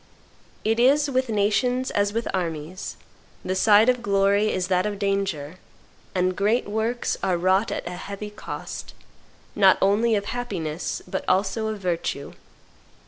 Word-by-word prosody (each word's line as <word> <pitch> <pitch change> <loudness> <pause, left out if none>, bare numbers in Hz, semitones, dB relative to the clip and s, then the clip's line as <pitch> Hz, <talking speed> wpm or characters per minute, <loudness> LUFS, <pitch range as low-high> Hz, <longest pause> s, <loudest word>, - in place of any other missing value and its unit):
It 225 +1 +1
is 280 +4 +4
with 260 -1 0
nations 245 +5 +1
as 205 0 +1
with 230 +2 -2
armies; 170 -1 -4 0.5
the 185 - 0
side 210 +3 +5
of 250 -1 +2
glory 200 0 +2
is 180 -1 -1
that 185 +1 +1
of 205 -1 -4
danger; 195 -6 -2 0.6
and 185 0 +1
great 210 +5 +1
works 220 +3 -1
are 185 -2 +1
wrought 185 +4 +2
at - - -3
a - - -4
heavy 200 +3 -7
cost, 210 - -7 0.6
not 195 -2 +6
only 215 +4 +3
of 200 -1 -1
happiness, 180 -11 -4
but - - -3
also 195 +4 +1
of 215 -1 -3
virtue. 170 -6 -3
200 Hz, 145 wpm, -24 LUFS, 185-225 Hz, 0.6 s, not